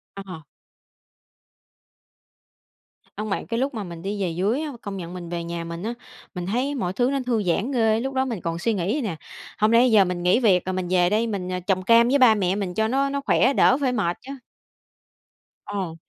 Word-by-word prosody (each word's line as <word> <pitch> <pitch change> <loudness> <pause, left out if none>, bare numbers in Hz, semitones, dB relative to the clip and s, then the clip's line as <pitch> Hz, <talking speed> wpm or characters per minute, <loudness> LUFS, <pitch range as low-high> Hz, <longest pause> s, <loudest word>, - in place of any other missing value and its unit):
Ờ. 185 -5 -8 2.7
Hông 215 +1 -4
bạn, 195 - -2
cái 230 - -2
lúc 270 +1 -1
mà 210 -3 -4
mình 170 -2 -9
đi 200 +1 -3
về 180 - 0
dưới 195 - 0
á, 310 -2 -4
công 200 -1 -5
nhận 175 -1 -7
mình 175 -2 -7
về 170 -1 -4
nhà 170 0 -5
mình 170 +1 -6
á, 230 +3 -3 0.4
mình 180 0 -4
thấy 255 +8 -1
mọi 185 -9 -2
thứ 245 +6 +1
nó 275 - 0
thư 235 -4 +1
giãn 195 +7 0
ghê. 225 -3 +2
Lúc 265 +2 -4
đó 265 0 +2
mình 230 -8 -4
còn 165 0 -3
suy 220 +5 0
nghĩ 185 +1 -1
vậy 290 -1 -1
nè: 195 -8 -3 0.4
"Hổng 215 +1 +3
lẽ 235 +2 +6
giờ 215 -5 +5
mình 180 -1 -3
nghỉ 180 +8 +3
việc 190 -7 +3
rồi 185 - -2
mình 185 -1 -3
về 180 -1 +3
đây 220 +3 +1
mình, 195 -5 -3
ờ, 180 0 -3
trồng 185 +1 0
cam 230 +4 +5
với 280 +3 +3
ba 240 -4 +6
mẹ 190 -3 0
mình 195 -3 -3
cho 220 0 +1
nó 275 +3 +1
nó 280 0 -2
khỏe, 275 -1 +3
đỡ 255 - +4
phải 260 -3 +1
mệt 185 -7 0
chớ." 270 +2 -9 1.3
Ờ. 190 -5 -4
205 Hz, 230 wpm, -23 LUFS, 180-240 Hz, 2.7 s, lẽ